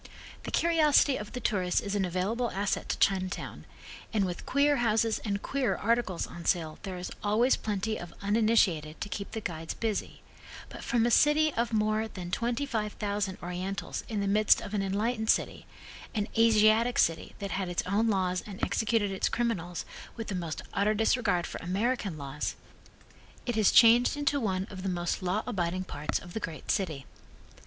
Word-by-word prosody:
The -, -, -4 dB
curiosity 305 Hz, -4 st, +4 dB
of 210 Hz, -3 st, -6 dB
the 250 Hz, -, -3 dB
tourist 185 Hz, -6 st, +1 dB
is 200 Hz, -, -4 dB
an 200 Hz, -2 st, +1 dB
available 200 Hz, +7 st, -1 dB
asset 200 Hz, +1 st, -2 dB
to -, -, 0 dB
Chinatown, 185 Hz, -1 st, -1 dB, 0.5 s
and 210 Hz, -3 st, +1 dB
with 175 Hz, -1 st, -5 dB
queer 285 Hz, +1 st, +3 dB
houses 225 Hz, -2 st, +2 dB
and 200 Hz, -2 st, -3 dB
queerer 270 Hz, -3 st, 0 dB
articles 230 Hz, -5 st, 0 dB
on 170 Hz, -, -9 dB
sale 160 Hz, -4 st, 0 dB
there 190 Hz, -2 st, -5 dB
is 180 Hz, -, -6 dB
always 220 Hz, +5 st, +3 dB
plenty 215 Hz, +1 st, -2 dB
of 175 Hz, -, -8 dB
uninitiated 200 Hz, -7 st, +2 dB
to 205 Hz, -, -4 dB
keep 200 Hz, -1 st, -5 dB
the 220 Hz, -, -3 dB
guides 165 Hz, -4 st, -5 dB
busy, 220 Hz, -3 st, -3 dB, 0.5 s
but -, -, -9 dB
from 235 Hz, -1 st, +2 dB
a 240 Hz, -, +2 dB
city 300 Hz, +3 st, +4 dB
of 235 Hz, 0 st, -1 dB
more 215 Hz, 0 st, +1 dB
than 180 Hz, -4 st, -8 dB
twenty 240 Hz, +6 st, -1 dB
five 215 Hz, -6 st, -2 dB
thousand 205 Hz, -2 st, -2 dB
Orientals 180 Hz, +3 st, -4 dB
in 215 Hz, -3 st, -1 dB
the 200 Hz, -, -1 dB
midst 210 Hz, +1 st, +4 dB
of 205 Hz, -, -8 dB
an 205 Hz, -, +1 dB
enlightened 220 Hz, +4 st, -1 dB
city -, -, +1 dB, 0.5 s
an 210 Hz, -1 st, 0 dB
Asiatic 225 Hz, +1 st, +4 dB
city 165 Hz, -1 st, +1 dB
that 200 Hz, -1 st, -5 dB
had 190 Hz, -2 st, -2 dB
its 175 Hz, -, -1 dB
own 205 Hz, +5 st, +1 dB
laws 185 Hz, -3 st, +1 dB
and 195 Hz, -2 st, -8 dB
executed 220 Hz, -2 st, +1 dB
its 190 Hz, -, 0 dB
criminals 180 Hz, -8 st, -2 dB, 0.3 s
with 225 Hz, -2 st, -6 dB
the -, -, -2 dB
most 170 Hz, -4 st, -4 dB
utter 210 Hz, +2 st, +2 dB
disregard 215 Hz, -5 st, +2 dB
for -, -, -6 dB
American 195 Hz, 0 st, -1 dB
laws, 140 Hz, 0 st, -4 dB, 0.9 s
it 240 Hz, -, -1 dB
has 215 Hz, -3 st, +4 dB
changed 240 Hz, +3 st, +6 dB
into 290 Hz, 0 st, +1 dB
one 190 Hz, -5 st, -1 dB
of 190 Hz, -2 st, -7 dB
the 190 Hz, -, -2 dB
most 175 Hz, 0 st, -2 dB
law 185 Hz, +4 st, 0 dB
abiding 185 Hz, -5 st, -1 dB
parts 150 Hz, -5 st, -3 dB
of 175 Hz, -, -10 dB
the -, -, -2 dB
great 165 Hz, -6 st, -4 dB
city. 155 Hz, -9 st, -2 dB
205 Hz, 180 wpm, -29 LUFS, 185-230 Hz, 0.9 s, changed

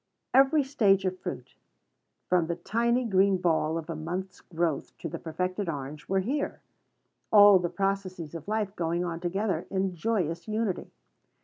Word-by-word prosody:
Every 275 Hz, +3 st, +5 dB
stage 205 Hz, -8 st, +2 dB
of 185 Hz, 0 st, -2 dB
fruit, -, -, -6 dB, 0.7 s
from 180 Hz, -3 st, +2 dB
the 170 Hz, -, -1 dB
tiny 235 Hz, +7 st, 0 dB
green 195 Hz, -2 st, +3 dB
ball 165 Hz, -3 st, +1 dB
of 160 Hz, -1 st, -5 dB
a 165 Hz, -, -4 dB
month's 180 Hz, +5 st, -5 dB
growth 165 Hz, -3 st, -2 dB
to -, -, -5 dB
the -, -, -6 dB
perfected 180 Hz, +3 st, -3 dB
orange, 145 Hz, 0 st, -6 dB
were 195 Hz, 0 st, +2 dB
here; 275 Hz, +9 st, -2 dB, 0.7 s
all 205 Hz, -2 st, +8 dB
the 175 Hz, -1 st, -1 dB
processes 185 Hz, -3 st, -2 dB
of 165 Hz, 0 st, -8 dB
life 210 Hz, -2 st, -1 dB
going 170 Hz, +1 st, -1 dB
on 165 Hz, -1 st, -4 dB
together 195 Hz, +4 st, -1 dB
in 190 Hz, -1 st, -1 dB
joyous 170 Hz, -4 st, -1 dB
unity. 215 Hz, -3 st, -2 dB
185 Hz, 155 wpm, -28 LUFS, 170-205 Hz, 0.7 s, all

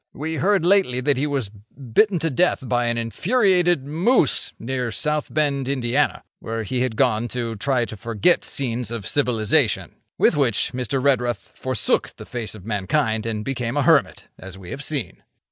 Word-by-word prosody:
We 160 Hz, +2 st, -4 dB
heard 195 Hz, -2 st, +2 dB
lately 185 Hz, -10 st, +3 dB
that 140 Hz, 0 st, +1 dB
he 145 Hz, +3 st, 0 dB
was 135 Hz, -8 st, -2 dB
bitten 125 Hz, -, -1 dB
to 165 Hz, 0 st, -1 dB
death 135 Hz, -2 st, +1 dB
by 120 Hz, -1 st, +1 dB
an 120 Hz, 0 st, 0 dB
infuriated 175 Hz, -, +1 dB
moose 165 Hz, -, +2 dB
near 125 Hz, 0 st, -3 dB
South 150 Hz, +6 st, -1 dB
Bend, 140 Hz, -3 st, 0 dB
Ind., 135 Hz, -3 st, -2 dB, 0.5 s
where 115 Hz, 0 st, -4 dB
he 125 Hz, +4 st, -2 dB
had 125 Hz, -3 st, -1 dB
gone 120 Hz, -2 st, +1 dB
to 120 Hz, -2 st, -3 dB
try 125 Hz, +3 st, 0 dB
to 110 Hz, -, -8 dB
forget 115 Hz, -, +1 dB
scenes 125 Hz, -4 st, -1 dB
of 115 Hz, -5 st, -5 dB
civilisation.' 115 Hz, -4 st, +2 dB, 0.2 s
With -, -, +3 dB
which, 130 Hz, -7 st, +1 dB
Mr. 125 Hz, +2 st, -2 dB
Redruth 125 Hz, -4 st, 0 dB
forsook 130 Hz, -4 st, -1 dB
the -, -, -11 dB
face 115 Hz, -3 st, -5 dB
of 100 Hz, -3 st, -13 dB
mankind 110 Hz, +1 st, -1 dB
and 105 Hz, -2 st, -3 dB
became 125 Hz, -1 st, -3 dB
a 145 Hz, -, +2 dB
hermit, -, -, +2 dB
as 95 Hz, 0 st, -10 dB
we 95 Hz, -2 st, -11 dB
have 140 Hz, +1 st, -5 dB
seen. 145 Hz, -6 st, -3 dB
125 Hz, 175 wpm, -22 LUFS, 115-150 Hz, 0.5 s, lately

